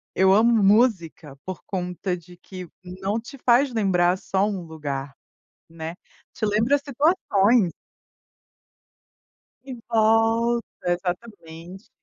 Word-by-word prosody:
eu 190 0 +4
amo 225 +4 +4
música 190 - +1
por 185 -2 -6
conta 180 -1 -3
de 175 +1 -15
que 185 0 -10 0.2
não 190 +4 -3
te 255 +4 -12
faz 250 +1 +3
lembrar 185 -4 +2
só 190 +1 0
um 195 -4 -4
lugar, 145 -4 -6 0.6
né, 165 0 -7 0.4
te - - -4
lembra 220 +7 +2
situações. 245 - +2 1.9
E 265 -1 -7
volta, 225 +1 +2 0.3
exatamente. 180 -1 -7
195 Hz, 105 wpm, -23 LUFS, 175-230 Hz, 1.9 s, eu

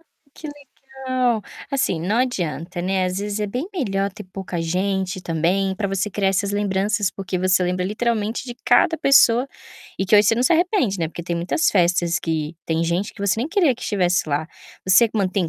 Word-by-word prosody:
Ah, 330 - -30 0.3
que 310 - -9 0.4
legal. 255 -4 -1 0.3
Assim, 225 -11 0
não 190 +7 -1
adianta, 175 - -2
né, 190 0 0
às 180 +1 -3
vezes 205 +1 -3
é 210 - 0
bem 250 - -4
melhor 200 - -1
ter 210 0 -10
pouca 185 -2 -6
gente, 185 +2 -1
também, 180 +4 0
pra 200 +1 -2
você 195 +1 -1
criar 195 -1 0
essas 195 +1 0
lembranças, 205 0 0
porque 185 -2 -4
você 185 0 +2
lembra 180 0 -1
literalmente 220 +2 -1
de 245 -2 -7
cada 250 +7 +4
pessoa, 275 -3 +4 0.5
e 190 - -1
que 200 - +3
hoje 210 0 +5
você 225 - +4
não 245 - 0
se 255 - +3
arrepende, 335 - +1
né, 165 - -1
porque 170 - -8
tem 170 0 -3
muitas 175 - 0
festas 175 -2 +2
que 160 -1 -3
tem 165 0 0
gente 175 +4 -1
que - - -13
você 200 -2 +2
nem 255 +7 -1
queria 340 -8 +2
que 250 - -13
estivesse 185 -5 0
lá. 150 +2 -1 0.4
Você 190 +5 +6
mantém 190 -4 0
195 Hz, 200 wpm, -21 LUFS, 180-230 Hz, 0.5 s, Você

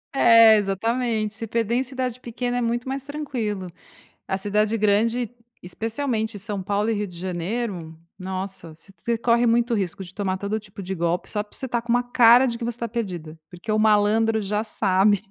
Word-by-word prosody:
É, 230 -3 +7
exatamente. 215 +2 -1
Se 225 +1 -6
perder 230 +1 -1
em 255 - +2
cidade 255 -2 -4
pequena 245 0 -3
é - - 0
muito 240 +1 -1
mais 270 0 -3
tranquilo. 245 -10 -4 0.6
A 190 - -1
cidade 210 +3 +1
grande, 220 +3 +2 0.3
especialmente 220 +3 -2
São 205 0 -4
Paulo 205 +3 0
e - - +1
Rio 205 0 -2
de 180 - -10
Janeiro, 180 -1 -4 0.2
nossa! 185 -3 -6
Você 195 +5 -16
você 235 0 -1
corre 235 +1 +2
muito 235 +1 +2
risco 195 -3 -2
de 180 -1 -11
tomar 190 -2 -2
todo 200 +2 -2
tipo 205 -2 -10
de 190 +1 -4
golpe 170 +1 -1
só 210 0 -2
porque 210 - -16
você 265 - -3
tá 240 -1 0
com 235 0 -8
uma 245 +1 +3
cara 245 0 +6
de 235 -2 -2
que 235 - -5
você 235 0 -3
tá 235 - -2
perdida, 180 -9 -5
porque 180 +5 -8
o 215 - +2
malandro 220 +1 +3
já 210 +2 -1
sabe. 200 -1 +2
215 Hz, 195 wpm, -23 LUFS, 195-235 Hz, 0.6 s, É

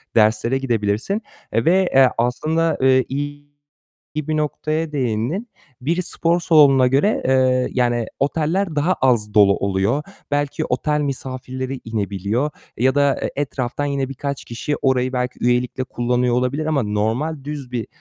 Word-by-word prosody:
derslere 110 +3 +3
gidebilirsin 115 - -1 0.3
ve, 180 +10 +3
eee, 135 -1 +7
aslında, 155 +8 +1
eee, 130 -1 +4
iyi 145 +1 -4 0.7
bir 155 +1 -1
noktaya 155 +1 -2
değindin. 130 - -1 0.3
Biri 170 +7 0
spor 170 0 0
salonuna 140 -6 +5
göre, 145 - +2
eee, 130 -1 +3
yani 120 -2 +1
oteller 160 +5 0
daha 155 +5 +2
az 120 - +1
dolu 100 -2 +5
oluyor. 100 +8 0 0.3
Belki 145 -1 -1
otel 150 +4 0
misafirleri 130 -1 -4
inebiliyor 110 +5 -2 0.3
ya 130 +4 +2
da, 140 -1 +3
eee, - - -2
etraftan 140 -1 -2
yine 140 -2 -1
birkaç 140 0 -5
kişi 120 +5 -3
orayı 130 -1 +1
belki 125 0 -2
üyelikle 125 +1 +1
kullanıyor 125 0 0
olabilir 125 +5 0
ama 150 -5 +1
normal 115 +9 -1
düz 145 -4 -6
bir 120 -3 -3
130 Hz, 135 wpm, -20 LUFS, 120-150 Hz, 0.7 s, eee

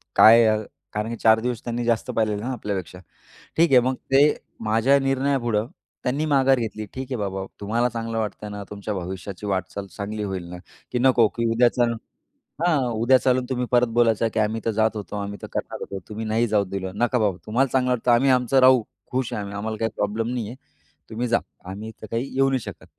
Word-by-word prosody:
काय 115 +1 +8
आहे 110 0 +1 0.3
कारण 105 +2 -2
की 115 - -3
चार 110 0 +6
दिवस 120 -1 -3
त्यांनी 120 0 -3
जास्त 115 -2 0
पाहिलेले 105 -2 0
ना 130 +3 -3
आपल्यापेक्षा. 95 -6 -5 0.6
ठीक 165 -1 +4
आहे 125 - +8
मग 130 +2 0 0.2
ते 135 +1 +7 0.4
माझ्या 115 +6 +3
निर्णयापुढं 135 -5 0 0.4
त्यांनी 140 +5 -1
माघार 135 -3 +4
घेतली. 110 -2 -4
ठीक 130 0 -4
आहे 125 - -1
बाबा 95 -1 -3 0.2
तुम्हाला 115 +4 +1
चांगलं 115 -1 -4
वाटतंय 105 -1 -4
ना 105 0 -6
तुमच्या 105 0 -5
भविष्याची 95 +2 -6
वाटचाल 100 +1 -3
चांगली 105 +1 -4
होईल 95 -3 -3
ना 90 - -7 0.4
की 125 - +1
नको 125 -3 +5
की 115 -1 -2
उद्या 120 +2 +4
चालून 120 -2 +1 0.7
हां, 175 -4 +3
उद्या 120 +4 +4
चालून 125 0 +1
तुम्ही 125 -1 -1
परत 120 0 +5
बोलायचं 115 -1 +3
की 110 - +2
"आम्ही 110 +1 0
तर 115 - +1
जात 110 0 +2
होतो", 105 0 -6
"आम्ही 100 0 -4
तर - - -5
करणार - - -3
होतो", 100 - -5
"तुम्ही 110 +1 -5
नाही 115 +2 +1
जाऊ 105 -1 +2
दिलं". 95 -1 -5
"नका 120 +2 +1
बाबा 100 -5 +1
तुम्हाला 125 +5 +2
चांगलं 125 -1 +2
वाटतं 125 0 +1
आम्ही 130 +3 +4
आमचं 125 +1 +3
राहू. 130 -2 +6 0.3
खुश 130 -1 -1
आहे 105 - -2
आम्ही, 100 0 -7
आम्हाला 110 +2 -3
काही 115 - 0
प्रॉब्लेम 110 +3 -1
नाही 115 -4 -2
आहे. 125 - -8 0.5
तुम्ही 120 +3 -2
जा, 115 0 +3 0.3
आम्ही 110 +3 -7
तर 110 - -8
काही 120 +4 -2
येऊ 135 0 +3
नाही 130 -1 +1
शकत." - - -9
115 Hz, 210 wpm, -24 LUFS, 105-125 Hz, 0.7 s, काय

